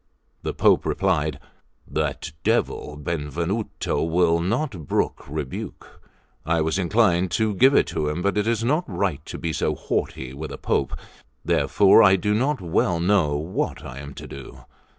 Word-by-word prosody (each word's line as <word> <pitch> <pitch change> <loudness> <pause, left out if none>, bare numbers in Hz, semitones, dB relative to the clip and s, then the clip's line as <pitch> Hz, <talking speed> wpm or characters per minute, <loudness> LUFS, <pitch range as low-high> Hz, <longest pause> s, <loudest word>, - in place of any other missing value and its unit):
The - - -4
Pope - - +4
replied: 80 -6 0 0.5
"That - - -2
devil 75 - 0
Benvenuto 85 +7 -2
will 85 0 +2
not 100 - -2
brook - - -1
rebuke. 75 -3 -6 0.4
I 85 0 +1
was 80 +3 0
inclined 95 -1 +2
to 110 -1 +1
give 130 +8 +5
it - - +3
him, 75 +3 -1
but 100 -1 +1
it 105 +1 0
is 115 -1 +1
not 150 +8 +2
right 95 -8 -2
to - - -6
be 80 -1 -3
so - - 0
haughty 65 0 -3
with 75 +3 -6
a - - -6
Pope. - - -1 0.5
Therefore 100 +2 +5
I 95 -3 +7
do 105 +3 0
not 130 +5 0
well 85 0 +1
know 85 -5 +2
what 80 +5 -3
I 65 +2 -8
am 70 -1 -9
to - - -8
do." 70 0 -10
85 Hz, 160 wpm, -23 LUFS, 75-105 Hz, 0.5 s, I